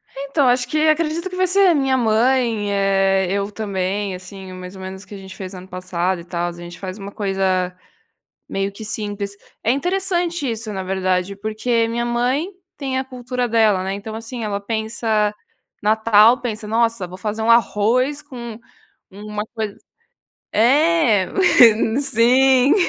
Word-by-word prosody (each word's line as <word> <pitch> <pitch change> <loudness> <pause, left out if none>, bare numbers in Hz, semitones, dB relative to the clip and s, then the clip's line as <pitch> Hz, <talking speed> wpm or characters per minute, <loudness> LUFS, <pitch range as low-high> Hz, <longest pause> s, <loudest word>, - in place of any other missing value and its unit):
Então, 280 0 0
acho 250 0 +2
que 310 +3 +1
acredito 325 +3 +1
que 365 - -7
vai 370 0 +2
ser 390 +2 +4
a 345 - +4
minha 270 -2 +2
mãe, 230 -2 +2
eh, 195 -1 +2
eu 200 +1 -1
também, 200 -1 -2
assim, 185 +1 -10
mais 185 +1 -9
ou 190 - -10
menos, 190 +1 -7
que 195 - -13
a - - -8
gente 190 -1 -11
fez 190 -1 -7
ano 185 0 -10
passado 185 -1 -2
e - - -11
tal 175 0 -3
a - - -3
gente 175 0 -10
faz 185 0 -6
uma 200 -1 -8
coisa, 190 -3 -1 0.7
meio 195 0 -2
que 200 +3 -10
simples, 205 -2 -3 0.3
é 225 - +3
interessante 345 0 -1
isso 225 -1 -3
na 190 -1 -4
verdade, 185 0 -1
porque 220 +3 0
minha 235 +1 -2
mãe 250 +8 0 0.3
tem 265 -2 -2
a 260 - 0
cultura 250 -1 -3
dela, 215 -5 +3
né, 190 +1 -2
então 205 +2 -6
assim 230 +1 -6
ela 205 -2 -2
pensa, 220 0 -1 0.5
Natal 220 +2 +5
pensa 220 -3 -4
nossa 230 -2 +1
vou 180 +1 -10
fazer 210 +3 -3
arroz 235 +5 +2
com 235 -5 -9 0.5
uma 210 +1 -5
coisa 220 -3 -4 0.8
é, 255 - +3 0.7
sim. 260 +1 +4
220 Hz, 160 wpm, -20 LUFS, 195-250 Hz, 0.8 s, Natal